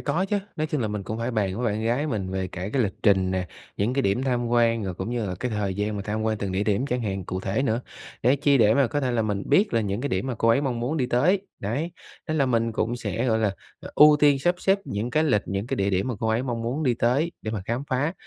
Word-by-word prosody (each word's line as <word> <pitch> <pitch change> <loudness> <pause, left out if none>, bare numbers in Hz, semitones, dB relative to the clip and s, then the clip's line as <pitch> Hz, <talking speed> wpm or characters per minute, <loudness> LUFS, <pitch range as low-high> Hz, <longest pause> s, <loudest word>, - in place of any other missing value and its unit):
có 185 +4 0
chớ. 205 - +1 0.2
Nói 155 0 0
chung 150 -3 -2
là 110 - 0
mình 105 -1 -3
cũng 110 +4 -5
phải 115 +2 -2
bàn 100 -4 -1
với 120 0 -1
bạn 110 - -3
gái 125 +7 +1
mình 100 -9 -2
về 95 -1 -2
cả 90 +2 -5
cái 135 - +2
lịch 100 -3 -1
trình 95 -3 +3
nè, 95 -1 -1 0.3
những 105 +5 0
cái 135 - +1
điểm 100 +3 +1
tham 120 -2 0
quan, 115 -1 +2
rồi 95 - -3
cũng 95 +6 -4
như 120 -3 -1
là 90 - -3
cái 125 +7 -3
thời 105 -3 -1
gian 105 +1 -2
mà 100 - -3
tham 105 +2 -3
quan 110 -1 0
từng 100 -2 -3
địa 95 +2 0
điểm 105 +6 +1
chẳng 125 -2 -1
hạn 95 -4 -3
cụ 95 0 -4
thể 100 +8 -1
nữa. 115 -2 0 0.4
Để 130 +4 +4
chi, 140 0 +3
để 110 -1 +5
mà 140 -3 +4
có 145 +4 -1
thể 130 -3 0
là 115 -2 +1
mình 105 -2 -1
biết 205 - +3
là 115 - +3
những 100 +1 -2
cái 140 - -2
điểm 95 +1 -1
mà 130 - -2
cô 115 - +1
ấy 115 +5 +4
mong 125 -4 -2
muốn 135 +7 -1
đi 130 -4 +1
tới. 160 +11 +2 0.2
Đấy, 140 - -2 0.4
nên 155 - 0
là 135 - +3
mình 115 -2 +1
cũng 115 +2 -1
sẽ, 115 +1 -2
gọi 110 -2 +2
là, 105 -3 0 0.4
ưu 150 0 +8
tiên 145 -2 +5
sắp 175 +6 +2
xếp 195 +2 +2
những 105 +4 -3
cái 155 +3 +2
lịch 105 -9 +2
những 100 +3 -3
cái - - -2
địa 100 0 +1
điểm 95 +6 0
mà 125 - -2
cô 110 - 0
ấy 115 +3 +1
mong 120 -3 -3
muốn 130 +7 -2
đi 125 -5 +2
tới 130 +9 +1
để 110 - -3
mà 105 -4 -3
khám 120 +5 -2
phá. 145 +6 +1
115 Hz, 300 wpm, -25 LUFS, 100-130 Hz, 0.4 s, ưu